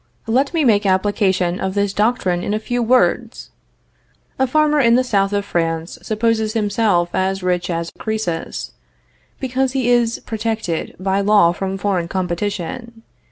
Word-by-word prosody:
Let 255 +5 +1
me 330 -3 +1
make 210 -5 +3
application 190 -2 +1
of 190 0 -3
this 200 -1 0
doctrine 210 -5 +1
in 205 - -1
a - - -1
few 245 +2 -2
words: 245 +2 +1 0.9
A 265 - +3
farmer 300 +2 +2
in 235 -3 +5
the 255 - +3
south 200 -5 +1
of 200 0 -1
France 165 -2 -2
supposes 220 0 0
himself 205 -5 +1
as 190 0 -1
rich 180 0 0
as 170 -1 -3
Croesus, 215 -7 -3 0.7
because 260 0 -1
he 255 -3 +1
is 235 -1 +2
protected 220 -6 -3
by 190 +1 0
law 200 -4 +5
from 190 +2 -3
foreign 190 -4 -1
competition. 200 +6 -4
205 Hz, 150 wpm, -19 LUFS, 185-235 Hz, 0.9 s, in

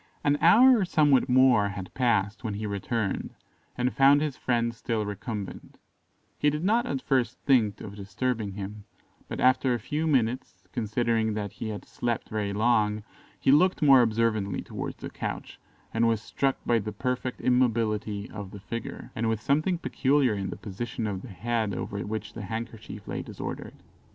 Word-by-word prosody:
An 145 0 +3
hour 245 +8 +7
or - - +2
somewhat 145 -7 +3
more 125 -5 +5
had 100 -2 -7
passed 110 -3 +1
when 110 -3 -3
he 105 +1 -4
returned, 100 +1 -2 0.4
and 125 +1 0
found 140 +1 +6
his 150 -3 -2
friend 120 -2 0
still 115 -2 -2
recumbent: 105 -1 -6 0.6
he 150 - +4
did 150 +2 -3
not 225 +5 +2
at 135 -2 -3
first 125 -3 +1
think 115 -7 +2
of 100 -1 -8
disturbing 105 +2 -2
him, 100 +1 -7 0.4
but - - -5
after 130 0 +3
a - - -3
few 150 +8 -2
minutes, 130 -3 0
considering 115 -1 0
that 105 -2 -3
he 115 - -6
had 105 -1 -6
slept 120 -2 -3
very 105 -2 -2
long, 105 0 +2 0.4
he - - +3
looked 180 +4 +4
more 135 -3 +8
observantly 110 -4 0
towards - - -6
the - - -7
couch, - - -5 0.3
and 115 +1 +3
was 115 -2 +2
struck 135 +5 -1
by 120 -1 +3
the 105 0 -4
perfect 125 +4 -3
immobility 110 -5 +1
of 100 -3 -7
the 100 - -10
figure, 115 +3 -6
and 110 0 0
with 110 -1 0
something 155 +9 +1
peculiar 140 -6 +2
in 100 -2 -3
the - - -6
position 110 +3 -5
of 100 -3 -3
the - - -9
head 110 +1 -2
over 100 +2 -4
which 110 +1 -4
the - - -7
handkerchief 110 -1 -6
lay - - -3
disordered. - - -7
115 Hz, 175 wpm, -27 LUFS, 105-130 Hz, 0.6 s, more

